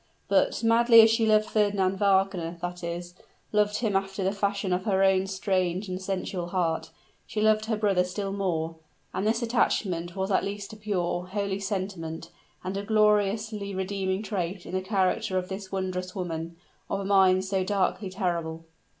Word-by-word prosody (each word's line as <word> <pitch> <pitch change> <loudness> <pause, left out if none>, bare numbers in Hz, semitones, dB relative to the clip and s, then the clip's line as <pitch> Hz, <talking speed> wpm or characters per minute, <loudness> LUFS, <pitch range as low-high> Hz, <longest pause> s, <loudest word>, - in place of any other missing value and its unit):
But, - - +2
madly 230 0 +7
as 220 0 +6
she 225 0 +2
loved 215 0 +4
Fernand 200 -3 +1
Wagner 190 -4 +1
that 175 0 -5
is, 175 +1 -5 0.4
loved 210 0 +2
him 215 -4 0
after 195 0 -1
the 190 - +2
fashion 200 -1 -1
of 180 +2 -1
her 195 -3 +2
own 190 0 +3
strange 190 0 -1
and 185 0 -4
sensual 185 -2 -3
heart 175 -2 -1 0.4
she 215 - -4
loved 215 0 +3
her 220 -1 -1
brother 200 -4 +2
still 195 +2 -4
more; 165 -5 -2 0.4
and 195 +3 -1
this 225 +2 +1
attachment 185 -7 0
was 190 +1 -2
at 190 - +3
least 200 +2 -5
a - - -8
pure, 180 -4 -2
a 185 +3 -14
holy 200 -1 -1
sentiment, 190 -5 -4 0.3
and 185 +2 -3
a - - -1
gloriously 210 -1 +1
redeeming 190 +1 -2
trait 190 -3 -3
in - - -8
the 185 - 0
character 190 +1 0
of 180 0 -2
this 190 0 -6
wondrous 185 -1 -3
woman, 165 -3 -4 0.3
of 195 - -1
a 195 - -4
mind 190 -1 +4
so 190 -1 0
darkly 195 +1 0
terrible. 170 -4 -3
195 Hz, 175 wpm, -27 LUFS, 185-205 Hz, 0.4 s, madly